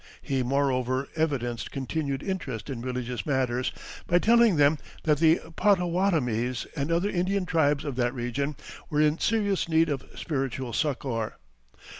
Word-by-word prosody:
He 135 -2 0
moreover 130 0 0
evidenced 130 -7 -1
continued 140 0 -3
interest 145 - -4
in 120 -3 -5
religious 125 -1 -3
matters 130 -3 0 0.4
by 175 - +4
telling 230 +1 +5
them 145 0 +4 0.2
that 150 -2 +2
the 165 +1 +5 0.2
Pottowattamies 170 - +1
and 145 +1 -2
other 175 +5 +2
Indian 190 +1 0
tribes 150 -4 +2
of 140 -3 -3
that 120 +1 0
region 130 +4 -2 0.3
were 150 - 0
in 155 +1 +3
serious 205 -5 +1
need 165 0 +3
of 140 -3 -2
spiritual 135 -5 -3
succor. 130 -4 -1
140 Hz, 140 wpm, -27 LUFS, 125-165 Hz, 0.4 s, telling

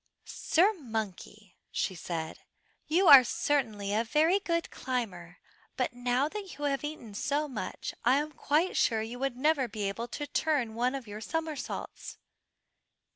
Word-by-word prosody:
"Sir 380 +7 +2
Monkey," 215 - -6
she 190 - -1
said, 165 -2 -5 0.5
"you 345 +5 +3
are 275 -4 +11
certainly 220 -7 0
a 220 +2 +2
very 315 - +3
good 335 -4 -1
climber, 195 -10 -4 0.4
but 255 -1 0
now 245 +3 +1
that 395 +2 -7
you 290 - -3
have 275 -1 0
eaten 295 -8 -6
so 290 +8 -1
much, 215 -9 -5
I 250 +3 +5
am 300 +2 0
quite 305 +5 +1
sure 220 -2 +2
you 235 +3 -7
would 270 -2 -2
never 285 -1 +2
be 205 -2 -3
able 230 +4 -3
to 290 +4 -5
turn 290 -7 0
one 245 +4 0
of 270 -3 -5
your 210 0 -8
somersaults." 310 +2 -4
255 Hz, 155 wpm, -30 LUFS, 220-300 Hz, 0.5 s, are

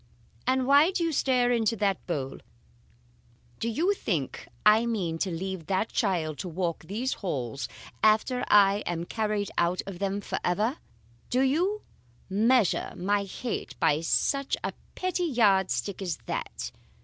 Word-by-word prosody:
'And 260 0 +2
why 285 +5 +6
do 370 -2 -1
you 330 - +1
stare 255 -4 +2
into 230 -2 +2
that 200 -3 -1
bowl? 135 -6 -3 1.2
Do 230 - -1
you 335 - +2
think 165 - -3 0.2
I 215 +2 +6
mean 180 -8 -1
to 190 - 0
leave 185 -1 -4
that 195 +3 0
child 170 -8 0
to 185 - -4
walk 170 -1 -2
these 230 +9 -2
halls 135 - -3 0.3
after 220 +4 +3
I 200 -1 +6
am 170 -1 -2
carried 210 -1 -1
out 175 +1 +1
of 195 -3 -7
them 200 0 -1
forever? 210 - -1 0.5
Do 255 - +2
you 350 +11 +1 0.5
measure 225 +1 +3
my 200 +2 0
hate 230 +5 -5
by 150 +1 +3
such 275 +11 +1
a - - -2 0.2
petty 365 -1 -1
yard 205 - +3
stick 200 -1 -2
as 180 -4 -2
that? - - -4
205 Hz, 150 wpm, -28 LUFS, 180-250 Hz, 1.2 s, why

